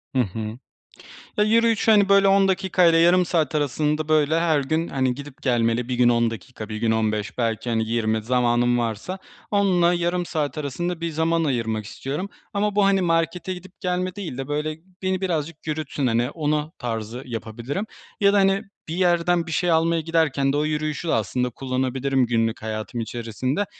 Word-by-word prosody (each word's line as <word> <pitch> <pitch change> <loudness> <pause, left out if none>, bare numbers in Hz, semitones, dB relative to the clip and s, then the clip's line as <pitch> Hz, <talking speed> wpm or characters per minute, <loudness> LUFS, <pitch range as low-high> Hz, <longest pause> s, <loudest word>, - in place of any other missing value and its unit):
Hı 130 - +4
hı. 110 +2 -4 0.8
Ya, 210 - +4
yürüyüşü, 225 0 +3
hani, 200 -2 +5
böyle, 200 0 +6
10 195 0 +5
dakika 185 -1 +2
ile 165 -1 +5
yarım 175 +2 +5
saat 160 -4 0
arasında, 150 +1 0
böyle, 155 +1 +3
her 160 -3 +2
gün, 160 +4 -1
hani, 130 -2 0
gidip 140 -1 -10
gelmeli. 120 -1 +1
Bir 125 - 0
gün 120 0 +4
10 115 -1 +2
dakika, 110 0 -8
bir 110 - -4
gün 110 0 +1
15 105 -1 -1
belki, 115 0 -1
hani, 110 -1 +1
20 110 -2 0
zamanım 120 0 +2
varsa 120 - -3 0.3
10'la, 180 -4 +3
yarım 175 +1 0
saat 155 -2 -2
arasında 165 +4 -3
bir 170 - -1
zaman 165 +1 +1
ayırmak 115 -6 -1
istiyorum 145 - -5 0.2
ama 205 0 0
bu, 205 -1 +4
hani, 195 -1 +3
markete 165 +2 0
gidip 185 +1 -12
gelme 180 +1 -1
değil 170 -11 -6
de, 135 0 -4
böyle, 150 +1 -2 0.2
beni 185 0 -1
birazcık 160 -4 -3
yürütsün, 150 -3 -2
hani, 120 +2 +1
ona 150 -1 -1
tarzı 115 +1 -4
yapabilirim 120 - -4 0.4
ya 200 0 +5
da, - - +4
hani, 195 0 +3 0.3
bir 160 - -4
yerden 175 -1 +2
bir - - -5
şey 175 +1 +1
almaya 165 0 +2
giderken 150 -4 +1
de 145 - +1
o 150 - +1
yürüyüşü 155 +2 -2
de - - +1
aslında 125 +4 0
kullanabilirim, 130 +1 0
günlük 115 -1 0
hayatım 110 +2 -4
içerisinde. 120 - -2
150 Hz, 180 wpm, -23 LUFS, 120-175 Hz, 0.8 s, böyle